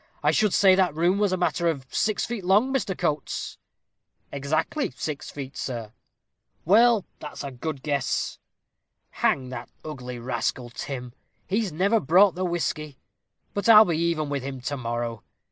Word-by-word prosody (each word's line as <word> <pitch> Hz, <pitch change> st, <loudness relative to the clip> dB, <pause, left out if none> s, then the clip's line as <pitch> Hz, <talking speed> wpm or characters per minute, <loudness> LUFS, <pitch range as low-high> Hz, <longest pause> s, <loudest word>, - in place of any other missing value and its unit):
I -, -, +4 dB
should 210 Hz, -2 st, +2 dB
say 190 Hz, 0 st, +6 dB
that 185 Hz, -5 st, +2 dB
room 175 Hz, +5 st, +2 dB
was 205 Hz, -2 st, +2 dB
a 185 Hz, -, +1 dB
matter 175 Hz, -1 st, 0 dB
of 140 Hz, -5 st, -1 dB
six 215 Hz, -1 st, 0 dB
feet 230 Hz, -4 st, -5 dB
long, 210 Hz, +9 st, +3 dB
Mr. 215 Hz, -8 st, -1 dB
Coates." 155 Hz, -4 st, -2 dB, 0.7 s
"Exactly 155 Hz, -, -1 dB
six 140 Hz, +2 st, -5 dB
feet, 135 Hz, -1 st, -7 dB
sir." 115 Hz, -4 st, -5 dB, 0.7 s
"Well, 220 Hz, +3 st, +5 dB
that's 150 Hz, -, -7 dB
a 140 Hz, -, -5 dB
good 135 Hz, +2 st, -5 dB
guess. 140 Hz, -4 st, -1 dB, 0.7 s
Hang 130 Hz, -2 st, 0 dB
that 125 Hz, -1 st, -7 dB, 0.2 s
ugly 125 Hz, -5 st, -6 dB
rascal, 120 Hz, 0 st, -3 dB
Tim; 125 Hz, -1 st, -6 dB, 0.3 s
he's 205 Hz, 0 st, -1 dB
never 195 Hz, +8 st, +2 dB
brought 185 Hz, +3 st, +5 dB
the 185 Hz, -, -3 dB
whisky. 155 Hz, -4 st, -2 dB, 0.6 s
But 205 Hz, +3 st, -1 dB
I'll 220 Hz, -1 st, +10 dB
be 170 Hz, -4 st, 0 dB
even 165 Hz, -2 st, 0 dB
with 140 Hz, -1 st, -2 dB
him 135 Hz, 0 st, -6 dB
to 145 Hz, +3 st, -3 dB
morrow. 120 Hz, -3 st, -4 dB
155 Hz, 160 wpm, -25 LUFS, 135-190 Hz, 0.7 s, I'll